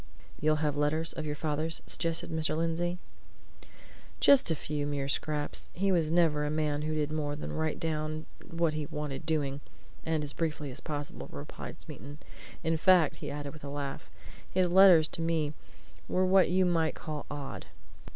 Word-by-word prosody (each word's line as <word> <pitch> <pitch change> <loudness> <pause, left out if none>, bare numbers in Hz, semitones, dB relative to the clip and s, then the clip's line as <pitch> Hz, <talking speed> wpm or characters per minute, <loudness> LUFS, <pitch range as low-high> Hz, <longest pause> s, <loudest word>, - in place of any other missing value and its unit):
"You'll 155 0 +2
have 145 -1 0
letters 150 +3 +3
of 155 -1 -4
your 150 - -2
father's?" 155 +1 -1
suggested 165 -1 -2
Mr. 160 -1 0
Lindsey. 170 +2 0 1.2
"Just 275 -8 +6
a 160 - +2
few 145 -1 -3
mere 140 -1 -2
scraps 150 +1 -1
he 195 +2 +1
was 165 -4 +2
never 165 -3 +3
a 150 - 0
man 150 -1 0
who 155 +1 -2
did 150 -1 -1
more 150 -2 -2
than 150 - -5
write 160 -1 -1
down 155 -1 -2 0.2
what 165 -1 +1
he 155 -1 -3
wanted 150 0 -5
doing, 145 -3 -1 0.4
and 160 -2 0
as 145 - +3
briefly 150 -4 -2
as 125 - -5
possible," 145 -1 -5
replied 70 +1 -8
Smeaton. 145 +2 -9 0.5
"In 165 0 +1
fact," 180 -1 +4
he 145 - -6
added, 145 0 -5
with 155 - -13
a 140 - -5
laugh, 140 -1 -5 0.4
"his 180 -1 +1
letters 180 -4 +8
to - - -5
me 160 -3 0 0.5
were 185 +1 +2
what 190 0 +5
you 185 +1 +3
might 165 -3 +1
call 155 -3 -6
odd. 145 -2 -6
155 Hz, 175 wpm, -30 LUFS, 145-165 Hz, 1.2 s, letters